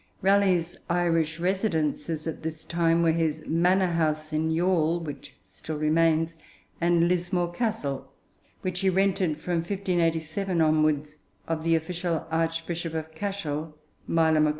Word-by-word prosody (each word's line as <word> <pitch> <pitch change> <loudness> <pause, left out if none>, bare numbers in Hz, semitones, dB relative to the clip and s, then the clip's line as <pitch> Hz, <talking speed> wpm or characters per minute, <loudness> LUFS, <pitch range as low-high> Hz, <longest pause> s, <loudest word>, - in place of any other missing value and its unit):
Raleigh's 190 -3 +3
Irish 165 -2 +1
residences 165 -5 -1
at 160 - -4
this 160 0 -5
time 170 0 +2
were 165 - +4
his 160 -1 0
manor 180 +2 +2
house 155 -1 0
in 155 +1 +1
Youghal, 170 0 +2
which 155 -4 -8
still 155 -1 -7
remains, 160 +1 +2 0.5
and 170 0 +3
Lismore 175 0 0
Castle, 210 - -2 0.5
which 185 -1 -2
he 190 0 +2
rented, 185 -4 +1
from 175 +2 -1
1587 175 -1 -1
onwards, 155 -1 +2 0.3
of 160 -1 -2
the 165 0 +3
official 170 +1 -2
Archbishop 165 0 -2
of 160 0 -4
Cashel, 160 -5 -4 0.3
Meiler 160 -1 +3
Magrath. 155 - +4
165 Hz, 130 wpm, -27 LUFS, 160-180 Hz, 0.5 s, were